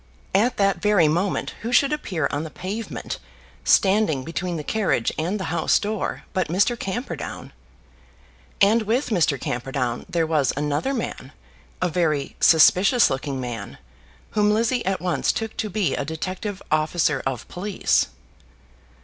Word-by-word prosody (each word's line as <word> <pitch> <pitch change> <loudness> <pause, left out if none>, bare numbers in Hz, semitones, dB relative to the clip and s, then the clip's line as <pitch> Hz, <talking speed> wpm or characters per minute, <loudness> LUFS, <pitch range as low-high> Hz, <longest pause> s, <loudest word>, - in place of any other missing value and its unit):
At 235 +5 +2
that 195 -1 +2
very 205 -6 +4
moment 175 +5 0
who 230 +2 -3
should 280 +3 +4
appear 175 - -1
on 145 +2 -2
the 160 - -6
pavement, 205 +8 -5 0.4
standing 190 -9 +3
between 175 +3 -3
the 150 - -5
carriage 195 - 0
and 180 +7 -2
the - - -3
house 165 -2 +3
door, 215 0 -3
but 185 -2 0
Mr. 195 +8 +2
Camperdown! 230 +3 -5 1.1
And 215 +4 +5
with 230 +6 0
Mr. 165 - +2
Camperdown 125 -1 -3
there 165 -1 +1
was 150 -5 +1
another 150 - -1
man, 235 - -5 0.5
a - - +3
very 155 -5 0
suspicious 185 - +5
looking 135 0 -3
man, 120 -3 -6 0.5
whom 210 -1 +2
Lizzie 230 +3 +1
at 195 -1 0
once 180 -1 +1
took 225 -1 -4
to 215 - -2
be 200 -1 0
a - - -1
detective 185 +6 -5
officer 155 -1 +1
of 130 -3 -4
police. 195 +2 0
180 Hz, 145 wpm, -23 LUFS, 155-210 Hz, 1.1 s, And